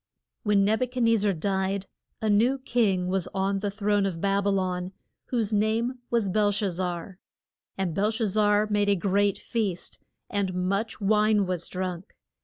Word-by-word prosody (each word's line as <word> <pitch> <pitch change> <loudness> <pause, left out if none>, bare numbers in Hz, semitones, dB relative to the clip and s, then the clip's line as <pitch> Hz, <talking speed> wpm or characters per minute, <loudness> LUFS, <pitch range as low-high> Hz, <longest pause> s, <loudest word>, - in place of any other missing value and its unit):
When 205 -3 +3
Neb 220 +4 +1
u 255 - +2
chad 250 0 -2
nez 230 -1 +4
zar 205 0 +2
died, 190 +2 -1 0.4
a - - +1
new 225 +6 +3
king 215 -8 +1
was 185 -1 -1
on 195 +1 0
the 205 +1 -2
throne 205 0 +1
of 175 -4 -4
Bab 200 +2 +1
y 200 - +3
lon 185 -1 -1 0.3
whose 225 -4 -1
name 225 +4 +1
was 230 -4 +1
Bel 205 +2 +2
shaz 200 -1 -1
zar. 180 0 -4 0.6
And 190 -4 -1
Bel 205 +5 +1
shaz 225 -1 -1
zar 210 +1 +3
made 205 0 +2
a 200 - +4
great 200 +1 +1
feast, 205 -7 -3 0.3
and 195 -3 -1
much 195 +4 -1
wine 210 0 +3
was 180 -2 -3
drunk. 185 -1 -5
200 Hz, 180 wpm, -26 LUFS, 190-215 Hz, 0.6 s, nez